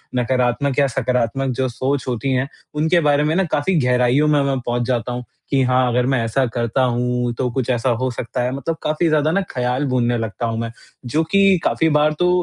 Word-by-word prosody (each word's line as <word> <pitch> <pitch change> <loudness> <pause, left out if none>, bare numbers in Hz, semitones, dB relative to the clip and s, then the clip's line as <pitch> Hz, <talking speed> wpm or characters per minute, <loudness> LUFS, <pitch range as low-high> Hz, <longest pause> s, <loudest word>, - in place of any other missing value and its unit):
नकारात्मक 125 +2 0
या 140 - +4
सकारात्मक 125 +1 -1
जो 130 - +1
सोच 130 +1 -2
होती 130 +2 -2
है 130 +1 0 0.3
उनके 160 +3 +2
बारे 145 0 +3
में 155 +2 0
ना 190 - +2
काफ़ी 165 +6 +1
गहराइयों 125 +4 +3
में 150 -1 +3
मैं 135 -1 0
पहुँच 120 0 -1
जाता 125 -1 -1
हूँ 125 0 -4 0.3
कि 135 -2 +2
हाँ, 125 0 +2
अगर 125 +1 +1
मैं 130 -3 +1
ऐसा 130 +4 +1
करता 120 +2 0
हूँ 125 0 0
तो 125 -1 0
कुछ 130 -1 -2
ऐसा 125 0 +1
हो 130 - +1
सकता 120 +1 -4
है। 125 +1 -1
मतलब 140 +4 -3
काफ़ी 155 +3 0
ज़्यादा 155 0 +2
न 195 - +1
ख़्याल 125 +2 -1
बुनने 120 -2 +1
लगता 115 0 -3
हूँ 115 0 -3
मैं 115 0 -3 0.3
जो 155 +7 0
कि 195 -1 +5
काफ़ी 160 - +2
बार 150 +1 +3
तो 180 - +3
130 Hz, 215 wpm, -20 LUFS, 120-145 Hz, 0.3 s, कि